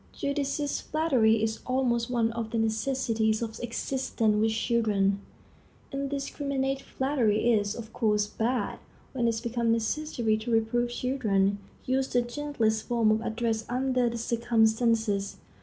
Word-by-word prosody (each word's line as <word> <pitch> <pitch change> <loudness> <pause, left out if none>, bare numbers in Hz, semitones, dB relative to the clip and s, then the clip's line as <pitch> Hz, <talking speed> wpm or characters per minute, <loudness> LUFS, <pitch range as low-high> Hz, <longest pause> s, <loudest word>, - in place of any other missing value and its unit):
Judicious 280 0 -2
flattery 250 -8 +2
is 220 0 -1
almost 250 -2 +1
one 230 -2 +1
of 230 -1 -4
the 230 - -2
necessities 220 -1 0
of 225 -1 -5
existence 240 -2 -1
with 220 +1 +2
children. 210 -4 +1 0.7
Indiscriminate 275 -1 -2
flattery 240 -4 +1
is, 205 -1 +1
of 230 -1 -8
course, 210 -2 +2
bad. 235 +4 -2 0.3
When 240 -3 +1
it 225 -1 0
becomes 235 -1 0
necessary 230 -1 0
to 220 +2 -6
reprove 230 +1 +1
children, 210 -6 0 0.3
use 260 +1 +1
the 245 0 +1
gentlest 240 -4 -1
form 230 -3 +3
of 215 +1 +1
address 225 -1 -1
under 255 -1 +1
the 235 - -4
circumstances. 225 -3 +1
235 Hz, 130 wpm, -28 LUFS, 220-255 Hz, 0.7 s, form